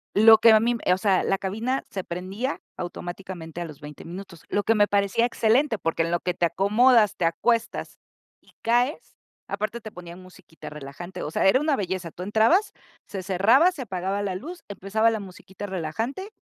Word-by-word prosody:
Lo 220 +1 +8
que 230 - +7
a 220 - +7
mí 235 +2 +1
m 235 - -3
eh, 180 - +4
o 185 - +1
sea, 195 -2 +2
la 195 - +1
cabina 220 +8 -2
se 190 - -4
prendía, 190 +10 -4 0.2
automáticamente 175 -1 -7
a - - -3
los 155 -2 -11
20, 150 -1 -11
minutos. 175 -1 -9
Lo 205 - 0
que 225 - +3
me 205 -2 +3
parecía 200 +3 +2
excelente, 235 +1 +2
porque, 165 -1 -1
en 165 - -2
lo 175 - +1
que 180 - -2
te 175 0 +1
acomodas, 210 +4 +4
te 175 - -1
acuestas, 230 +7 -1 0.4
y - - -24
caes, 245 +6 0 0.3
aparte, 215 +3 -3
te 215 - -9
ponían 175 -1 -10
musiquita 185 -3 -13
relajante, 150 +5 -8
o - - -3
sea, - - 0
era 255 +7 +5
una 300 -1 +1
belleza. 185 -3 -3
Tú 180 - -8
entrabas, 225 - +3 0.3
se 195 - -5
cerraba, 210 - +4
se 290 -7 -6
apagaba 195 -1 -3
la 195 -2 -2
luz, 335 - -8
empezaba 205 +3 +1
la 220 - -2
musiquita 190 +1 -9
relajante, 220 - -4
200 Hz, 195 wpm, -25 LUFS, 180-230 Hz, 0.4 s, Lo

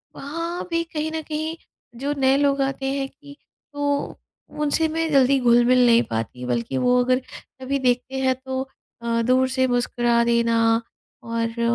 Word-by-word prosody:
वहाँ 335 +5 -4
भी 335 0 +1
कहीं 315 -1 -4
न 320 - -3
कहीं 315 +1 -4 0.4
जो 285 +2 -1
नए 265 0 +3
लोग 280 -1 +2
आते 270 0 -2
हैं 275 -1 -2
कि 285 +1 -15 0.4
तो 285 0 -2 0.4
उनसे 300 +2 +2
मैं 325 0 -1
जल्दी 275 0 +4
घुल-मिल 245 0 +4
नहीं 235 0 +5
पाती 115 +3 -4
बल्कि 120 +1 -2
वो 250 - +3
अगर 255 0 +2 0.4
कभी 275 +1 -1
देखते 255 +1 0
हैं 260 -1 +2
तो 260 0 -2 0.4
अ, 230 0 0
दूर 255 +2 +3
से 260 0 +1
मुस्कुरा 240 -1 +1
देना 235 -1 +2 0.7
और, 230 0 -3
260 Hz, 160 wpm, -23 LUFS, 240-285 Hz, 0.7 s, नहीं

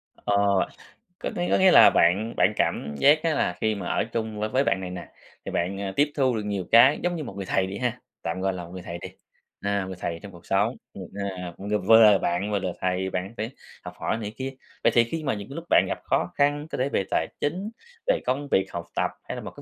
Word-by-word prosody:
Ờ, 100 - -1 0.8
có - - -3
nghĩa 175 0 -1
có - - +5
nghĩa 190 -1 +6
là - - +9
bạn 100 +7 +2
bạn 105 - +4
cảm 75 0 -1
giác 150 - +5
á 165 - +2
là 90 -10 0
khi 110 -1 +1
mà 95 -3 -5
ở - - +1
chung 110 -2 -3
với 110 0 -1
với 130 +4 +2
bạn 95 -8 0
này 90 - -5
nè, 90 - -8 0.3
thì - - -4
bạn, 95 +3 -1
à, 95 -1 -3
tiếp 145 +1 +3
thu 130 -4 +2
được 105 - -2
nhiều 100 -3 -2
cái, 120 +5 +7
giống 175 0 0
như 155 - -4
một - - -7
người 100 - -4
thầy 95 0 +1
đi 95 - -5
ha, 125 -2 -2 0.2
tạm 85 +3 -3
gọi 95 0 0
là 90 -1 -6
một - - -13
người 90 - -7
thầy 85 0 -6
đi, 85 - -8 0.5
à, 100 -1 -1
người 95 - -6
thầy 85 -1 -3
trong 100 - -9
cuộc 85 -1 -15
sống, 105 +6 +1 0.2
ừm, 95 - -8 0.3
à, 90 -2 -6
cũng, 100 +1 -7
ờ, 105 - +3
vừa 110 +3 +6
là 100 - +5
bạn, 90 +5 -1
vừa 100 - +1
là 95 - -2
thầy, 95 +1 -1
bạn 95 +3 -4
phải 110 +2 -3 0.3
học - - -8
hỏi - - -1
này 105 -1 -5
kia, 135 0 -4 0.3
vậy - - +5
thì 120 - +7
khi 155 +7 -4
mà 135 - 0
những 105 -2 -6
cái 140 - -8
lúc 165 - -6
bạn - - +5
gặp - - -3
khó 90 - 0
khăn, 145 +1 +1
có - - -3
thể 130 +2 0
về 100 - 0
tài 80 - +1
chính, 185 +8 -2 0.4
về - - +3
công 140 +2 -1
việc, 95 0 +2
học 85 0 -4
tập, - - 0
hay - - -6
là - - -6
một - - -7
cái - - -13
105 Hz, 275 wpm, -25 LUFS, 95-130 Hz, 0.8 s, là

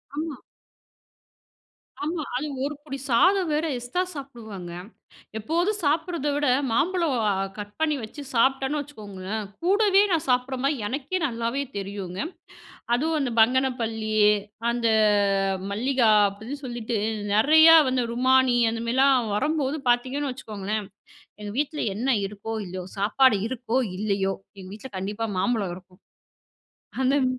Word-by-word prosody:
ஆமா. 310 -2 -4 1.7
ஆமா. 320 +1 -2
அது 280 +5 -2 0.2
ஒரு 295 - -3
புடி 275 -3 -6
சாதம் 360 +8 +4
வேற 310 +2 +1
எஸ்ட்ரா 245 +10 -1
சாப்பிடுவேங்க. 220 - -8 0.7
எப்போதும் 345 - 0
சாப்பிடுறத 320 0 0
விட 290 0 +1 0.2
மாம்பழம் 330 +2 +1
அ - - +3 0.3
கட் 205 0 -7
பண்ணி 315 -2 +2
வச்சு 290 +7 -8
சாப்ட்டேன்னு 270 +4 +2
வச்சுக்கோங்களேன். 210 -6 -6 0.2
கூடவே 395 +1 +4
நான் 325 -3 +1
சாப்பிடுற 250 +1 +1
மாரி 280 +2 +2
எனக்கே 290 - -2
நல்லாவே 235 +3 -2
தெரியுங்க. 195 -2 -5 0.8
அதுவும் 310 +5 0
அந்த 255 -3 -1
பங்கனப்பள்ளி, 230 -3 +1 0.6
அந்த 235 -1 -1 0.7
அ 190 0 -6
மல்லிகா 245 +2 +2 0.2
அப்டின்னு 220 +8 -7
சொல்லிட்டு 240 -2 -3 0.4
நெறையா 315 +9 +7
வந்து 255 -1 +1
ருமானி 255 0 +3
அந்த 225 0 -4
மாரிலாம் 255 -2 +3
வரம்போது 295 +3 0
பாத்தீங்கன்னு 260 +4 +1
வச்சுக்கோங்களேன், 215 -4 -4 0.6
எங்க 205 -1 -5
வீட்ல 300 +1 -2 0.2
என்ன 250 +5 -1 0.2
இருக்கோ, 210 +3 -6
இல்லையோ. 185 0 -6
சாப்பாடு 220 +5 +4
இருக்கோ, 245 -1 -2 0.2
இல்லையோ 195 -1 0 0.3
எங்க 185 - -9
வீட்ல 240 +5 -9
கண்டிப்பா 205 +4 -3
மாம்பழம் 205 -3 0
வரும். 185 +1 -14 1.0
அந்தம் 265 +1 +3
250 Hz, 125 wpm, -25 LUFS, 215-290 Hz, 1.7 s, நெறையா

